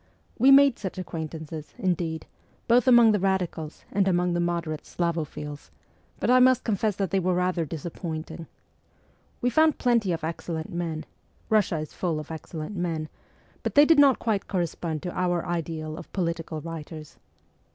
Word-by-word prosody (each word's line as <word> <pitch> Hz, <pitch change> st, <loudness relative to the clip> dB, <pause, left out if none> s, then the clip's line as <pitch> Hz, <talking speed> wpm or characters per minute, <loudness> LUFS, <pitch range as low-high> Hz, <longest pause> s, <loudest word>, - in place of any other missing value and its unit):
We 260 Hz, +4 st, +6 dB
made 275 Hz, -2 st, +7 dB
such 190 Hz, -3 st, -5 dB
acquaintances, 160 Hz, -3 st, -6 dB
indeed, 170 Hz, -3 st, -1 dB, 0.4 s
both 245 Hz, +2 st, +4 dB
among 240 Hz, -3 st, +7 dB
the 210 Hz, -, +2 dB
radicals 180 Hz, -5 st, -2 dB
and 195 Hz, -1 st, +2 dB
among 180 Hz, -1 st, +2 dB
the 175 Hz, -, 0 dB
moderate 170 Hz, -3 st, -2 dB
Slavophiles; 155 Hz, -4 st, -4 dB, 0.5 s
but -, -, -1 dB
I 255 Hz, -, +7 dB
must 255 Hz, 0 st, +5 dB
confess 215 Hz, -2 st, 0 dB
that 195 Hz, -4 st, -2 dB
they 195 Hz, -, +2 dB
were 185 Hz, 0 st, +1 dB
rather 180 Hz, -2 st, 0 dB
disappointing. 160 Hz, +1 st, -6 dB, 0.9 s
We 245 Hz, -, +1 dB
found 315 Hz, 0 st, +4 dB
plenty 235 Hz, -6 st, +2 dB
of 165 Hz, -1 st, -3 dB
excellent 160 Hz, 0 st, -4 dB
men 165 Hz, -2 st, -3 dB, 0.5 s
Eussia 185 Hz, -7 st, +2 dB
is 155 Hz, -, -11 dB
full 165 Hz, -4 st, -2 dB
of 155 Hz, +1 st, -8 dB
excel 160 Hz, 0 st, -7 dB
lent 180 Hz, +7 st, -6 dB
men 165 Hz, -4 st, -2 dB, 0.5 s
but -, -, -3 dB
they 290 Hz, +1 st, +8 dB
did 320 Hz, -1 st, +5 dB
not 275 Hz, -3 st, +6 dB
quite 215 Hz, -4 st, -1 dB
correspond 170 Hz, -4 st, -2 dB
to 180 Hz, -, -3 dB
our 175 Hz, -2 st, 0 dB
ideal 160 Hz, -2 st, -3 dB
of -, -, -10 dB
political 165 Hz, -3 st, -2 dB
writers. 160 Hz, -2 st, -8 dB
175 Hz, 160 wpm, -26 LUFS, 160-200 Hz, 0.9 s, they